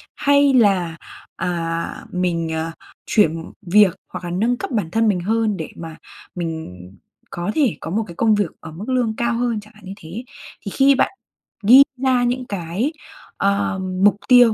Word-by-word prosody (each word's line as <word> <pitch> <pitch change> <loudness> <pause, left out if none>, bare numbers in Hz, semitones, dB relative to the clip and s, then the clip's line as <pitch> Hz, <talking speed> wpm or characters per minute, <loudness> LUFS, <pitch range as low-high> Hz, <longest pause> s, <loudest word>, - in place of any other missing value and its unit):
hay 285 -1 +4
là, 190 -9 +3 0.4
à, 170 -2 -2 0.3
mình, 170 -3 -1
à, 160 +1 -2 0.3
chuyển 165 -6 +1
việc 195 0 +4
hoặc 180 -1 -7
là 175 - -4
nâng 230 +7 +1
cấp - - -5
bản 205 -9 -1
thân 225 0 +2
mình 200 -4 +2
hơn 220 +1 0
để 160 - -5
mà 165 -1 -8 0.4
mình 165 -2 -4 0.6
có 175 +4 -3
thể 280 -9 +2
có 165 - -5
một 220 +3 0
cái 170 - -10
công 220 +2 +3
việc 205 - 0
ở 160 - -10
mức 190 +10 -8
lương 245 -4 +1
cao 235 0 0
hơn, 235 -2 0
chẳng 215 +2 -18
hạn 210 -2 -16
như 190 - -6
thế. 185 +9 -8 0.4
Thì 200 - -4
khi 275 0 +5
bạn - - +2 0.5
ghi 250 +7 +9
ra 255 -1 +2
những 250 +1 -1
cái, 195 - -2 0.4
ờ, 200 -1 0 0.2
mục 205 - +6
tiêu 245 -3 +7
205 Hz, 180 wpm, -20 LUFS, 175-240 Hz, 0.6 s, ghi